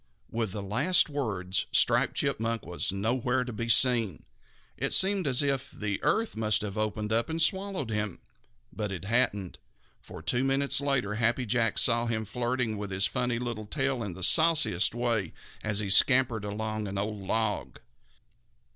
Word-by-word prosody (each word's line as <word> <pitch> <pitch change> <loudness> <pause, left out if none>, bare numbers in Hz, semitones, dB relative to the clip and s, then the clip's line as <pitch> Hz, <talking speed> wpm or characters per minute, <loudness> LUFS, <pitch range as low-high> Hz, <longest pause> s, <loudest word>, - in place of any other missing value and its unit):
With 115 -3 -2
the 100 +1 -5
last 140 - +2
words, 100 -10 -2
Striped - - +2
Chipmunk 115 0 -1
was 90 +2 -2
nowhere 120 +5 -1
to 125 -1 -7
be 115 +2 -4
seen. 115 -8 +3 0.5
It - - -2
seemed 190 -3 +3
as 135 +1 +2
if 135 -2 -1
the 105 -2 -4
earth 225 0 0
must 110 -1 +1
have 100 -1 -5
opened 110 0 -2
and 115 +9 0
swallowed 190 - 0
him. 105 -3 -3 0.6
But 105 -2 -4
it 95 -1 -6
hadn't, 105 -4 0 0.4
for - - -12
two 125 +1 0
minutes 135 +1 +2
later 135 -7 0
Happy 120 +3 0
Jack 115 -1 +1
saw 120 -1 +2
him 110 -1 -2
flirting 120 -1 -2
his 95 +1 +1
funny 120 +6 -1
little 115 -3 -5
tail 135 0 -1
in 100 -6 -5
the 95 - -7
sauciest 160 - +4
way 120 -4 -1 0.3
as 105 -1 -1
he 100 -2 -1
scampered 120 -2 +4
along 110 +1 -4
an 100 0 -5
old 105 +1 -3
log. 110 +2 -2
115 Hz, 160 wpm, -28 LUFS, 105-130 Hz, 0.6 s, sauciest